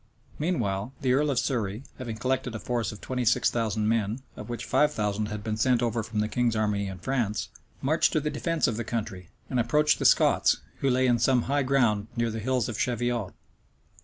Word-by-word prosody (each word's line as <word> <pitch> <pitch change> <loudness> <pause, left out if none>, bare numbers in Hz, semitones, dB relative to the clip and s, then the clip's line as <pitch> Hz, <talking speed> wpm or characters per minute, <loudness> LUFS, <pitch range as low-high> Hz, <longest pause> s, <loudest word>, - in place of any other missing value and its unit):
Meanwhile, 120 - -1
the 130 -2 +2
earl 145 +3 +2
of 135 - 0
Surrey, 115 -3 -1 0.2
having 120 -3 -4
collected 130 0 -1
a - - -4
force 120 0 -2
of 105 - -11
twenty 125 -1 -2
six 120 +1 +3
thousand 110 -2 0
men, 115 +2 0
of 105 - -9
which 120 0 -4
five 150 0 +3
thousand 105 -3 -1
had 105 0 -5
been 110 0 -2
sent 120 +1 +2
over 115 -1 0
from 105 0 -2
the 105 - 0
king's 120 0 0
army 105 -2 0
in 95 -1 -6
France, 115 0 -1 0.3
marched 155 +5 +3
to 155 - +3
the 150 0 -2
defence 165 +2 0
of 115 - 0
the 115 - -2
country, 105 -6 -4 0.2
and 125 - -1
approached 150 +6 +3
the - - -2
Scots, - - +4 0.2
who 135 - +1
lay 130 0 +3
on 120 -1 +3
some 125 +1 +3
high 140 +2 +1
ground 120 -6 +2
near 120 -1 0
the 110 - -4
hills 125 +1 0
of 110 -4 -5
Cheviot. 120 -4 -1
120 Hz, 215 wpm, -27 LUFS, 105-130 Hz, 0.3 s, Scots